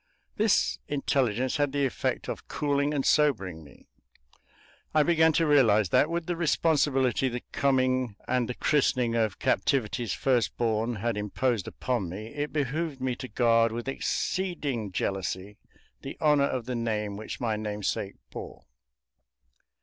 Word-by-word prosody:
This 215 -1 +2
intelligence 130 -3 0
had 145 -2 0
the 140 -1 +1
effect 130 - -2
of - - -6
cooling 145 0 0
and 140 -3 -1
sobering 100 - +2
me; 75 - -17 1.1
I 155 - +6
began 160 0 +4
to 165 - +2
realize 115 - +4
that, 150 - +3
with 170 0 -2
the 175 - -2
responsibility 145 -6 +2
the 125 0 -5
coming 130 -4 +1
and 125 -2 0
the 125 - -3
christening 130 -5 +1
of 110 -5 0
Captivity's 120 -4 0
first 125 -3 +1
born 115 0 0
had 110 +1 -2
imposed 105 +1 -1
upon 120 -8 -2
me, 105 +5 -7
it 145 0 -3
behooved 150 +1 -2
me 130 -1 -1
to 130 - -6
guard 115 -2 +3
with 120 +2 -5
exceeding 140 - -2
jealousy 95 +1 -3 0.4
the 135 - -7
honor 150 -2 +4
of 125 -4 -3
the 125 - -3
name 110 -3 -2
which 110 +2 -7
my 115 -3 0
namesake 105 -2 -3 0.2
bore. - - -9
125 Hz, 145 wpm, -28 LUFS, 110-145 Hz, 1.1 s, I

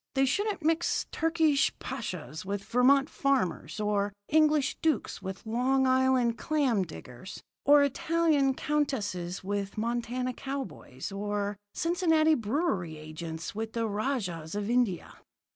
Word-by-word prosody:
They 270 0 +4
shouldn't 395 +6 -1
mix 325 +2 +1
Turkish 320 -3 +2
pashas 180 - -5
with 200 +1 -3
Vermont 270 +5 +4
farmers, 265 - -1
or 205 -1 0 0.2
English 305 -2 +3
dukes 315 -7 0
with 190 +3 -7
Long 255 +4 +2
Island 255 -2 +3
clam 275 -9 +1
diggers, 155 -1 -8 0.2
or 290 0 +7
Italian 285 -1 +2
countesses 205 -14 -2
with 200 +1 -3
Montana 240 +3 -1
cowboys, 265 - -6
or 205 +1 -2 0.2
Cincinnati 325 -2 +3
brewery 215 - -1
agents 160 +1 -6
with 220 +1 -4
the 230 -1 0
rajahs 205 - -2
of 205 +2 -2
India." 240 -8 0
240 Hz, 120 wpm, -29 LUFS, 200-285 Hz, 0.2 s, or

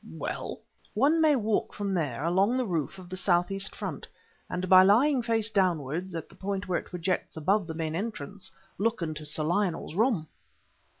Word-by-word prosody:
"Well?" - - -5 0.4
"One 290 +9 +4
may 310 -2 +5
walk 220 -4 0
from 200 -1 -2
there 145 -7 -1
along 195 +8 +2
the 255 - 0
roof 170 - -2
of 185 -1 -11
the 185 - -6
southeast 190 +1 +1
front, - - -5 0.4
and 180 +1 -3
by 185 0 +9
lying 245 +8 +4
face 225 -1 0
downwards 175 -2 0
at 165 - -5
the - - -18
point 195 0 -4
where 180 -2 +1
it - - -12
projects 180 -1 -2
above 190 +4 +1
the 160 - -5
main 160 -1 -2
entrance 200 -1 -5 0.3
look 220 -2 0
into 155 -2 -3
Sir 155 +1 0
Lionel's 175 0 0
room!" 215 -4 +2
190 Hz, 180 wpm, -28 LUFS, 165-210 Hz, 0.4 s, by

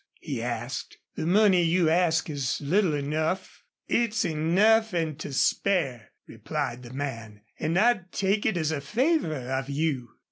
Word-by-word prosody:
he - - -4
asked. - - -4 0.2
"The 160 - -3
money 195 -1 +5
you 170 0 +2
ask 165 -1 +2
is 140 -5 -2
little 165 +2 +1
enough." 155 +5 -2 0.3
"It's 230 -2 +1
enough 190 +7 +3
an' 160 -4 -1
to 155 - -6
spare," 135 - 0 0.2
replied 125 +2 -4
the 120 -1 -11
man. 115 -6 -6 0.2
"An' 160 +3 0
I'd 200 -4 +2
take 200 +2 0
it 195 - 0
as 160 -2 0
a 150 -3 -2
favor 245 - +1 0.2
of 135 +1 -2
you." 140 -4 -1
160 Hz, 150 wpm, -27 LUFS, 140-190 Hz, 0.3 s, money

